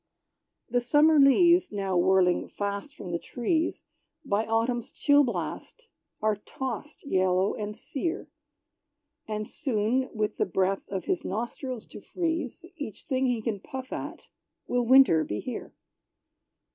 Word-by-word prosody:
The 245 Hz, 0 st, +1 dB
Summer 295 Hz, +5 st, +5 dB
leaves 345 Hz, +6 st, +5 dB
now 195 Hz, -2 st, -2 dB
whirling 180 Hz, 0 st, +3 dB
fast 200 Hz, +7 st, -4 dB
from 180 Hz, -, -7 dB
the 170 Hz, -, -1 dB
trees, 315 Hz, -, -1 dB, 0.4 s
By 205 Hz, +2 st, 0 dB
Autumn's 235 Hz, +3 st, 0 dB
chill 290 Hz, -1 st, +4 dB
blast 375 Hz, -, -4 dB, 0.4 s
are 215 Hz, -1 st, +2 dB
tossed 265 Hz, +7 st, -6 dB
yellow 185 Hz, -4 st, +2 dB
and 210 Hz, 0 st, -5 dB
sere; 325 Hz, +4 st, -4 dB, 1.0 s
And 215 Hz, -1 st, -3 dB
soon, 250 Hz, +1 st, 0 dB
with 215 Hz, -1 st, -2 dB
the -, -, +1 dB
breath 190 Hz, +1 st, 0 dB
of 190 Hz, -3 st, -4 dB
his 180 Hz, -, -1 dB
nostrils 235 Hz, +3 st, -4 dB
to -, -, -11 dB
freeze 335 Hz, -4 st, -3 dB
Each 285 Hz, -, -7 dB
thing 265 Hz, -2 st, 0 dB
he 240 Hz, -3 st, 0 dB
can 215 Hz, -4 st, -2 dB
puff 260 Hz, +5 st, -7 dB
at, -, -, -6 dB, 0.4 s
will 245 Hz, -1 st, 0 dB
Winter 255 Hz, -12 st, +7 dB
be 105 Hz, -7 st, -3 dB
here! -, -, -6 dB
230 Hz, 135 wpm, -28 LUFS, 200-275 Hz, 1.0 s, Winter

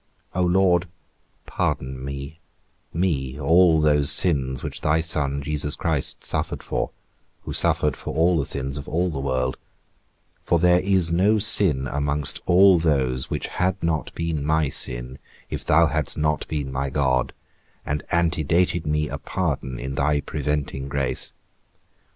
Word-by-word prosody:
O 90 Hz, -, -1 dB
Lord, 90 Hz, 0 st, +2 dB, 0.6 s
pardon 65 Hz, 0 st, -3 dB
me, 70 Hz, +3 st, -7 dB, 0.5 s
me, 75 Hz, -6 st, -2 dB
all 80 Hz, +2 st, +4 dB
those 75 Hz, -2 st, +5 dB
sins 65 Hz, -7 st, +2 dB
which -, -, -5 dB
thy 75 Hz, +1 st, +1 dB
Son 70 Hz, -4 st, -2 dB
Christ -, -, -13 dB
Jesus 75 Hz, 0 st, 0 dB
suffered -, -, -3 dB
for, -, -, -3 dB, 0.5 s
who -, -, -6 dB
suffered 75 Hz, -3 st, +1 dB
for -, -, -7 dB
all 85 Hz, +1 st, +2 dB
the 70 Hz, -, -1 dB
sins 70 Hz, +1 st, -3 dB
of 70 Hz, -, -8 dB
all 90 Hz, +2 st, -1 dB
the 70 Hz, -, -5 dB
world; 65 Hz, -1 st, -2 dB, 0.8 s
for 85 Hz, -, +1 dB
there 90 Hz, +1 st, +4 dB
is 95 Hz, -3 st, +1 dB
no 100 Hz, +6 st, +3 dB
sin 95 Hz, -10 st, +6 dB
amongst 70 Hz, +2 st, -1 dB
all 95 Hz, 0 st, +5 dB
those 65 Hz, -6 st, 0 dB
which -, -, -3 dB
had 90 Hz, +2 st, -1 dB
not 80 Hz, -2 st, -1 dB
been 80 Hz, -3 st, -3 dB
my 75 Hz, -1 st, +1 dB
sin, 65 Hz, 0 st, +1 dB, 0.3 s
if -, -, -4 dB
thou 85 Hz, +2 st, +4 dB
hadst 80 Hz, -3 st, -1 dB
not 75 Hz, 0 st, -1 dB
been 70 Hz, -3 st, -4 dB
my 65 Hz, +1 st, -3 dB
God, 65 Hz, -2 st, 0 dB, 0.5 s
and 75 Hz, +1 st, -2 dB
antedated 85 Hz, 0 st, 0 dB
me 75 Hz, 0 st, 0 dB
a -, -, -6 dB
pardon 65 Hz, -2 st, -3 dB
in 65 Hz, +2 st, -5 dB
thy 75 Hz, +2 st, 0 dB
preventing 75 Hz, -2 st, -3 dB
grace. 70 Hz, -2 st, 0 dB
75 Hz, 150 wpm, -23 LUFS, 70-85 Hz, 0.8 s, sin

